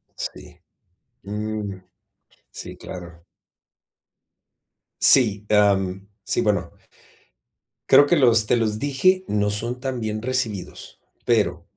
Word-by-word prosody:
Sí, - - -8 0.6
mm, 105 0 -5 0.8
sí - - -9
claro. 85 -2 -11 1.8
Sí, 105 -6 +5
am, 100 -2 +1 0.2
sí, 120 - -1
bueno. 100 -6 -1 1.2
Creo 140 +2 +7
que 170 +4 +2
los, 115 -6 +4
"te 120 - +2
lo 110 -2 -1
dije", 185 +8 +1
no 105 0 0
son 115 +5 -2
tan 130 -2 -4
bien 110 -1 -3
recibidos, 120 -6 -4 0.3
pero, 90 -7 0
105 Hz, 100 wpm, -22 LUFS, 100-125 Hz, 1.8 s, Creo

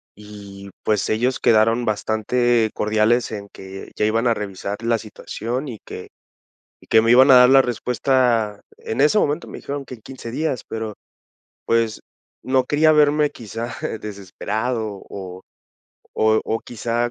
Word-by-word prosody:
y, 100 -1 -11
pues, 105 -2 0
ellos 125 +4 0
quedaron 115 +2 +3
bastante 110 +2 +1
cordiales 110 +3 +1
en 100 -2 -6
que 95 0 -10
ya 105 - +1
iban 115 +3 +1
a 120 - +4
revisar 100 -1 -5
la 115 0 +2
situación 115 +5 -5
y 115 -4 -7
que - - -9 0.7
y - - -20
que 110 - +5
me 115 +1 +1
iban 130 +3 +7
a 130 - +9
dar 125 0 +8
la 135 0 +7
respuesta 120 -3 0 0.2
en 110 - -4
ese 150 +9 +4
momento 150 0 0
me - - -8
dijeron 140 -1 -6
que - - -8
en 110 - -16
15 130 -2 -9
días, 135 -1 -2
pero, 110 -1 -4 0.7
pues, 115 -2 0 0.4
no 130 -1 +1
quería 155 +3 +3
verme 150 -1 +4
quizá 115 +1 -7 0.3
desesperado, 105 +2 -4
o 95 -2 -8 0.8
o 110 0 +3
o 115 - -1
quizá 120 +1 -2
115 Hz, 155 wpm, -21 LUFS, 105-125 Hz, 0.8 s, a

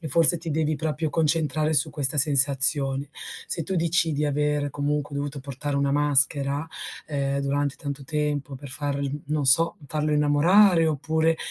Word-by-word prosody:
e 160 - -6
forse 165 +4 +3
ti 165 0 -6
devi 155 0 0
proprio 155 +2 -2
concentrare 155 0 +1
su 150 +1 +2
questa 145 0 0
sensazione. 140 -1 +1 0.4
Se 165 - -3
tu 190 +4 -3
dici 170 0 +1
di 150 +1 -1
aver 150 0 0
comunque 145 +1 -2
dovuto 140 0 -4
portare 140 +1 -4
una 140 0 +1
maschera, 145 0 +1 0.4
ehm, 140 -2 -2
durante 140 0 -1
tanto 140 -1 -6
tempo 145 -1 -3
per 140 0 -10
farl 140 0 -2 0.2
non 150 0 -1
so, 165 +6 +4
farlo 150 +1 -1
innamorare 165 +5 +4
oppure, 160 +2 0
145 Hz, 155 wpm, -25 LUFS, 140-155 Hz, 0.4 s, so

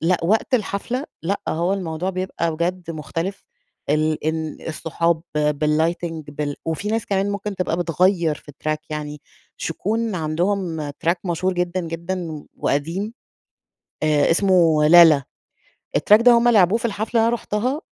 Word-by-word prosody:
لأ 175 +2 +2
وقت 220 +7 +2
الحفلة 235 +4 -1 0.2
لأ 195 +4 -1
هو 170 +4 0
الموضوع 180 -1 -2
بيبقى 185 -3 -2
بجد 175 +1 -2
مختلف، 165 +5 -4 0.5
ال 155 +1 +1
إن 160 0 -2
الصحاب، 165 +1 -1 0.2
بالlighting 155 +2 0
بال 145 0 -3
وفيه 165 +6 -2
ناس 225 +1 -1
كمان 200 -1 0
ممكن 200 0 -4
تبقى 180 -3 -1
بتغيّر 175 -1 +2
في 145 - -13
الtrack 155 +2 -2
يعني 150 -1 -5 0.4
ش - - -4
يكون 220 +5 -2
عندهم 165 -1 -1
track 165 +4 0
مشهور 180 +2 0
جدًا، 180 +1 -1
جدًا 170 -2 -5
وقديم، 170 +10 -1 0.9
آآ 150 -2 +3
إسمه 165 -4 +4
لالا، 160 -4 +8 0.8
الtrack 210 +2 +5
ده 245 - +7
هُم 235 0 +4
لعبوه 205 -2 +5
في 235 - -4
الحفلة 215 0 -3
اللي 225 - +3
أنا 235 - +2
رُحتها، 245 +7 -2
170 Hz, 145 wpm, -22 LUFS, 155-200 Hz, 0.9 s, لالا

